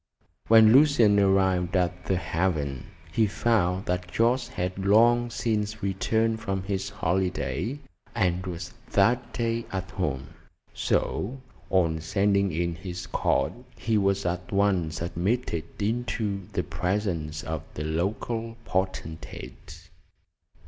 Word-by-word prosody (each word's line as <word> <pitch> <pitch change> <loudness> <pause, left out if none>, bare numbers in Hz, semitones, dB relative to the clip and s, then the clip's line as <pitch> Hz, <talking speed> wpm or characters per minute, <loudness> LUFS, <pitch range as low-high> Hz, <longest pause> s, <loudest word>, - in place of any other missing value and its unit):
When 110 -1 +8
Lucian 125 -8 +6
arrived 95 -2 +2
at 90 0 -1
"The 95 - +1
Haven," 80 -8 -1 0.2
he 110 +6 +3
found 95 -3 +1
that 90 0 -2
Jorce 120 +2 +2
had 95 -5 -3
long 120 +4 +5
since 110 -3 -2
returned 110 +3 +1
from 95 -4 -2
his 95 0 -2
holiday, 95 - -1 0.4
and 90 -4 +1
was 85 -1 -6 0.2
that 120 +4 +3
day 115 0 -1
at 95 -1 -4
home; 70 -9 -2 0.4
so 125 +7 -1 0.3
on 80 -4 +2
sending 100 +3 +2
in 85 +2 -1
his 90 +1 -6
card - - +1 0.2
he 115 -2 0
was 100 -1 +1
at 90 0 -2
once 95 -6 +1
admitted 85 0 -1
into 105 -3 -2
the - - -1
presence 90 -5 -2
of 80 -2 -3
the 75 - -3
local 110 +8 -2
potentate. 80 -5 -5
95 Hz, 120 wpm, -27 LUFS, 90-110 Hz, 0.4 s, When